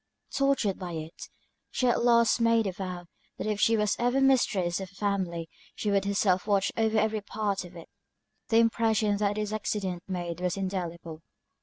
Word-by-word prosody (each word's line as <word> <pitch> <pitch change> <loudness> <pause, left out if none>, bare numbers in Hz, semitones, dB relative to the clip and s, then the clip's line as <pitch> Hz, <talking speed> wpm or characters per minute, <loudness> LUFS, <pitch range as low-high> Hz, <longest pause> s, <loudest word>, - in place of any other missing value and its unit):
Tortured 275 -8 +1
by 180 -2 -5
it, 160 +1 -7 0.4
she 255 - -1
at 240 -1 +2
last 235 -1 +4
made 230 -1 +3
a 195 - -1
vow, 180 -1 -6 0.3
that - - -4
if 210 -1 -1
she 225 0 +4
was 210 -1 +1
ever 245 +2 +2
mistress 210 -10 +2
of 190 -1 -6
a - - -23
family 190 -5 -2 0.3
she 210 - -1
would 200 -1 +2
herself 200 -1 +1
watch 200 -2 +2
over 220 -1 +1
every 215 0 +1
part 205 -1 -2
of 180 0 -12
it. 170 - -10 0.6
The 225 - +4
impression 225 -2 +2
that 205 0 0
this 210 0 -2
accident 200 -4 -2
made 175 -2 -4
was 180 +1 -1
indelible. 170 -4 -4
200 Hz, 180 wpm, -28 LUFS, 180-220 Hz, 0.6 s, last